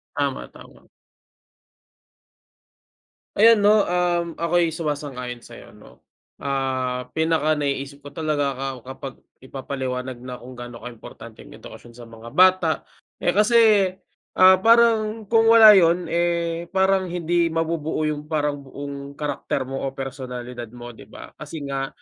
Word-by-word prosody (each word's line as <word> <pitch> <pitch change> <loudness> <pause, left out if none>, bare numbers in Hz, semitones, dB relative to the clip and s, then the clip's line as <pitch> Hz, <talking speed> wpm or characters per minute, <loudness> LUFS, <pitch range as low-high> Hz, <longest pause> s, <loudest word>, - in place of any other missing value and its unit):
Tama, - - -2
tama. - - -17 2.5
Ay 225 +2 +7
ano, 210 0 +3
um, 175 -1 -1
ako'y 170 -1 0
sumasang-ayon 140 -6 -5
sa'yo, - - -14
'no. - - -19 0.3
Ah, 130 -2 -3
pinaka 160 -1 +1
naiisip 140 -1 -4
ko 145 - -10
talaga 150 -3 -1
ka 135 - -3 0.2
kapag 135 0 -8 0.3
ipapaliwanag 130 -1 -5
na 125 0 -8
kung 125 +1 -12
gaano 120 -1 -9
kaimportante 115 -1 -11
ang - - -13
edukasyon 120 -1 -13
sa 120 - -12
mga 115 +1 -13
bata, 185 -3 +4 0.4
eh, 175 - +3
kasi, 215 -2 +4 0.5
ah, 185 0 +6
parang 225 0 +3
kung 225 0 +4
wala 225 -1 +9
yun, 175 -3 +3
eh, 170 0 -1
parang 190 0 +2
hindi 175 0 0
mabubuo 165 -1 -2
yung 150 -1 -3
parang 150 -2 -1
buong 140 +1 -8
karakter 145 -2 -3
mo 135 +1 -6
o 135 - -7
personalidad 125 -2 -7
mo, 120 0 -9
'di 110 - -15
ba? - - -12
Kasi 150 0 -8
nga, 135 -1 -3
150 Hz, 135 wpm, -22 LUFS, 130-175 Hz, 2.5 s, wala